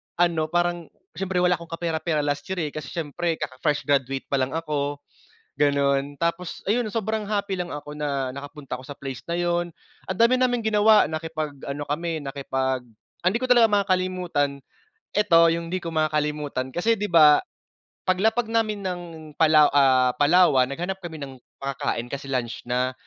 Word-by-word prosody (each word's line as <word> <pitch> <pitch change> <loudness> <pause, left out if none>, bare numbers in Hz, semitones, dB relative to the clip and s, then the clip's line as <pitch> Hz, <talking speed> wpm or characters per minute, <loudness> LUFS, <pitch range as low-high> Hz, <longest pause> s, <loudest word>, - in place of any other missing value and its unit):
ano, 170 -2 +2
parang 175 0 0 0.2
siyempre 185 -2 -1
wala 180 -1 +3
akong 170 - -10
kapera-pera 165 -2 -1
last 145 0 -2
year, 190 -3 -2
eh, 150 - -3
kasi 155 -2 -7
siyempre 165 +1 -2
kaka-fresh 150 0 -2
graduate 135 -2 0
pa 140 - +2
lang 130 +2 -1
ako, 145 -3 -2 0.6
gano'n. 140 -1 +2
Tapos 170 +2 -3
ayun, 225 +3 +1
sobrang 220 -1 -2
happy 200 -3 -1
lang 175 - -3
ako 145 -1 -7
na 140 -3 -2
nakapunta 140 -1 -7
ako - - -13
sa 145 - -7
place 135 -3 -6
na 170 - -1
'yon. 175 0 0 0.4
Ang 190 - -2
dami 240 +4 +4
naming 245 -2 +1
ginawa, 215 0 +5
nakipag-ano 155 -3 -4
kami, 160 +1 -3
nakipag 135 -1 -2 0.4
ang 180 - +4
hindi 220 - 0
ko 255 - -2
talaga 240 -2 +6
makakalimutan, 185 -7 0 0.5
eto, 170 -5 +5
yung 165 0 -2
hindi 185 +1 -2
ko 170 - -3
makakalimutan 150 -4 -1
kasi 200 - +2
di 210 -1 -3
ba, 155 -3 +7 0.7
paglapag 220 +6 +2
namin 215 -2 +1
ng 180 -1 -2 0.3
Palaw 155 -2 +6
ah, 130 -3 +4
Palawan, 145 -3 +4
naghanap 180 +7 -4
kami 165 -2 -6
ng 135 -2 -7 0.2
makakain 135 -3 -2
kasi 140 +2 -6
lunch 120 -3 -2
na. 125 +1 0
160 Hz, 165 wpm, -24 LUFS, 140-180 Hz, 0.7 s, ba